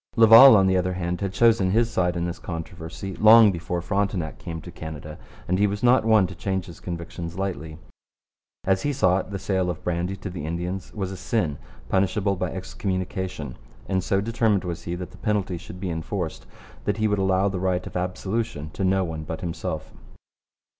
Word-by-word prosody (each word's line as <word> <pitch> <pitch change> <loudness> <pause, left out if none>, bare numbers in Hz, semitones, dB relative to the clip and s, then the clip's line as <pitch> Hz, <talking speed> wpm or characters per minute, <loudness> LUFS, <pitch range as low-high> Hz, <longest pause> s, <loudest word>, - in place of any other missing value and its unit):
Laval, 115 +2 +9
on 95 - +4
the 95 0 +3
other 90 0 0
hand, 90 0 -3
had 100 -1 -1
chosen 110 -2 +4
his 115 +4 +2
side 90 -1 +1
in 85 - -1
this 85 0 -4
controversy 85 +2 -6
long 110 0 +8
before 85 0 -3
Frontenac 95 -4 -1
came 85 -2 -6
to 85 +2 -10
Canada, 80 -2 -8 0.3
and 90 +2 +1
he 105 - +4
was 100 +2 -4
not 125 0 +5
one 110 -3 +5
to 90 - -6
change 95 +1 -2
his 85 -4 -11
convictions 85 0 -6
lightly. 80 -5 -4 0.9
As 95 -1 +2
he 145 - 0
saw 95 -8 +3
it, 95 - -6
the 100 - -4
sale 95 -2 -1
of 90 - -5
brandy 90 +2 -1
to 95 -1 -7
the 90 -4 -6
Indians 85 +4 -4
was 95 -3 -3
a 95 - -6
sin, 85 -12 -1 0.3
punishable 100 +1 +1
by 90 -2 -3
excommunication; 95 -5 -4 0.3
and 95 -2 0
so 95 +1 +1
determined 110 -2 +1
was 85 -2 -5
he 85 - -3
that 90 0 -7
the - - -14
penalty 100 -5 -1
should 90 +1 -10
be 95 -2 -3
enforced 80 +1 -4 0.4
that 105 0 0
he 110 0 +2
would 105 -1 0
allow 95 0 +2
the 95 -2 -2
right 90 -1 0
of - - -9
absolution 90 -1 -3
to 95 - -4
no 95 0 +2
one 80 -3 -4
but 80 +1 -6
himself. 85 -3 -4
95 Hz, 200 wpm, -24 LUFS, 85-100 Hz, 0.9 s, Laval